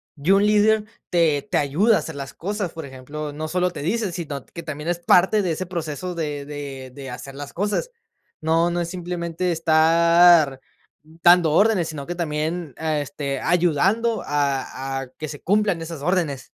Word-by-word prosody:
Y 150 +4 -4
un 195 +1 +5
líder 210 +1 +3 0.2
te 160 -5 +2
te - - +2
ayuda 170 +11 +3
a - - +2
hacer 160 - -6
las 140 -1 -7
cosas. 200 0 -3
Por 160 -2 -7
ejemplo, 145 +3 -7
no 155 +2 -4
solo 180 +2 0
te - - -7
dice, 210 +4 -1
sino, 145 -7 -5
que 170 - -9
también 155 0 -5
es 175 0 -1
parte 190 +4 +4
de 180 -4 -1
ese 185 +4 -4
proceso 170 0 -4
de 150 -4 -4
de 140 -3 -7
de 135 -1 -8
hacer 135 +2 -8
las 140 +1 -8
cosas. 205 - -1 0.5
No 165 +2 +2
no 175 0 -1
es 170 - -2
simplemente 175 0 -3
estar 165 -2 +5 0.4
dando 165 +2 +4
órdenes, 200 -2 +3
sino 145 -3 -6
que 175 - -4
también, 160 -1 -3
ah, 155 -2 -1
este, 140 -1 -4
ayudando 180 - +2
a 135 -2 -2
a 130 - -8
que 155 - -5
se 145 -1 -8
cumplan 200 -3 +1
esas 165 -3 -7
órdenes. 165 -6 -1
165 Hz, 180 wpm, -22 LUFS, 145-180 Hz, 0.5 s, un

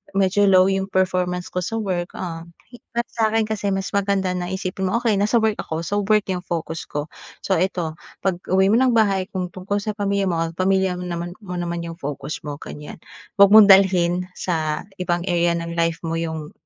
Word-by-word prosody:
medyo 195 +1 +3
low 185 -1 +6
yung 195 0 0
performance 180 -1 0
ko 180 - -1
sa 225 +5 -3
work." 180 -4 -2
Ah, 165 -3 -5 0.5
para 235 - +1
sa'kin 225 -1 +1
kasi 210 -2 -2
mas 195 0 -2
maganda 195 -2 +1
na 175 0 -3
isipin 190 0 -3
mo, 185 - 0
"Okey, 230 -4 +1
nasa 215 +4 +3
work 215 -1 +1
ako, 160 +1 -4
so, 205 +5 -1
work 215 -2 +4
yung 180 -1 -3
focus 165 -2 -4
ko." 150 +1 -4 0.4
So, 190 - +1
eto 175 -4 -1 0.3
pag-uwi 190 +1 +1
mo - - +4
ng 260 -1 +4
bahay 195 -4 +2
kung 185 -2 -2
tungkol 195 +3 -3
sa 215 - -1
pamilya 200 -1 0
mo 170 -2 0
o 165 0 -2
pamilya 190 0 +1
mo - - -5
naman 175 0 -4
mo 180 -2 -6
naman 170 -1 -3
yung 165 0 -6
focus 145 +1 -5
mo, 145 - -4
ganyan. 150 +1 -9 0.4
'Wag 200 0 +8
mong 215 -1 +9
dalhin 180 -2 +4
sa 160 -4 -2 0.2
ibang 175 -1 -1
area 175 -1 +2
ng 170 0 -4
life 165 -1 0
mo 165 0 -2
yung 160 -2 -4
185 Hz, 200 wpm, -22 LUFS, 170-195 Hz, 0.5 s, mong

